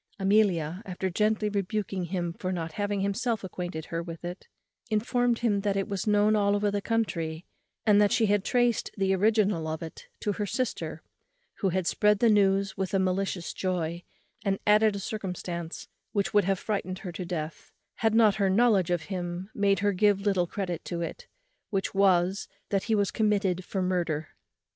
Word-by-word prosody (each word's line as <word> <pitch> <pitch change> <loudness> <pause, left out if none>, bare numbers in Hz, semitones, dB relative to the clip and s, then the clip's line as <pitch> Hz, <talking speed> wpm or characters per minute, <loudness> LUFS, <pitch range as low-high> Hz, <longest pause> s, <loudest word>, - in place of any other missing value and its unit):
Amelia, 195 -4 +2
after 190 -2 -3
gently 215 +3 +1
rebuking 200 -2 -2
him 175 -1 -2
for 185 +2 -4
not 165 -3 -3
having 205 +3 -2
himself 220 +3 -1
acquainted 175 -3 -5
her 165 0 -3
with 170 0 -8
it, 175 +2 -7 0.4
informed 240 +2 +1
him 205 -3 +2
that 200 -1 0
it 195 - -1
was 200 0 -3
known 210 +1 +4
all 200 -1 +3
over 205 0 +1
the 200 0 -1
country, 170 -8 -1 0.4
and 210 -1 +6
that 205 - +4
she 235 -2 +3
had 205 -1 +2
traced 245 0 +1
the 195 -1 +2
original 205 -4 +2
of 160 +1 -3
it 160 - -9
to 205 - 0
her 205 +1 -3
sister; 255 +5 -3 0.6
who 195 - +1
had 185 0 -1
spread 210 +3 +3
the 230 +2 +4
news 195 -1 +3
with 190 0 -2
a - - +5
malicious 185 -1 -1
joy, 175 -2 -2 0.4
and 195 -2 +1
added 210 0 +5
a - - -3
circumstance 180 -5 -5 0.3
which 200 -2 0
would 205 -2 +4
have 195 0 +1
frightened 185 -2 -3
her 180 - -3
to 180 - -5
death, 165 -3 -5 0.3
had 225 -1 +2
not 215 -3 +5
her 200 -2 +2
knowledge 200 -3 +3
of 175 -2 0
him 180 +1 -5
made 200 -1 +2
her 205 0 +2
give 200 +1 +3
little 195 -4 +1
credit 180 -3 -4
to 170 -1 -4
it, 165 - -6 0.4
which 195 -3 -1
was, 190 -1 +3 0.2
that 195 -1 0
he 225 - +2
was 200 -2 +1
committed 200 -4 +1
for 190 +1 -2
murder. 170 -4 -1
195 Hz, 185 wpm, -28 LUFS, 180-210 Hz, 0.6 s, and